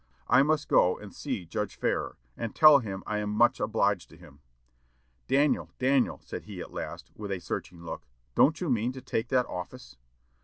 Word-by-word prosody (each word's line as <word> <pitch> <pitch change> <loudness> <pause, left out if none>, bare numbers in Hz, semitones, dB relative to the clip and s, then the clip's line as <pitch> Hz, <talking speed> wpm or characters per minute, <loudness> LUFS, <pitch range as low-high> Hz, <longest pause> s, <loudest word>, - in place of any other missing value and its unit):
"I - - +6
must 150 +1 +1
go 90 - +4
and 105 -2 -11
see 125 -11 -4
Judge 105 +3 -4
Farrar, - - -2 0.2
and 115 -2 -5
tell 155 -2 +8
him 95 -5 -6
I 105 0 -2
am 105 0 -2
much 110 +3 +3
obliged 105 -4 0
to 80 - -16
him." 75 -5 -16 0.9
"Daniel, 140 +2 +2
Daniel," 130 0 +2
said - - -7
he, - - -8
at - - -8
last, - - -6
with 105 -2 -6
a 95 - -1
searching 85 0 -6
look, 80 -6 -7 0.3
"don't 155 - +4
you 175 -6 -1
mean 120 +1 0
to 130 - -8
take 110 - -2
that 125 -2 +2
office?" 110 - -8
110 Hz, 190 wpm, -28 LUFS, 95-130 Hz, 0.9 s, tell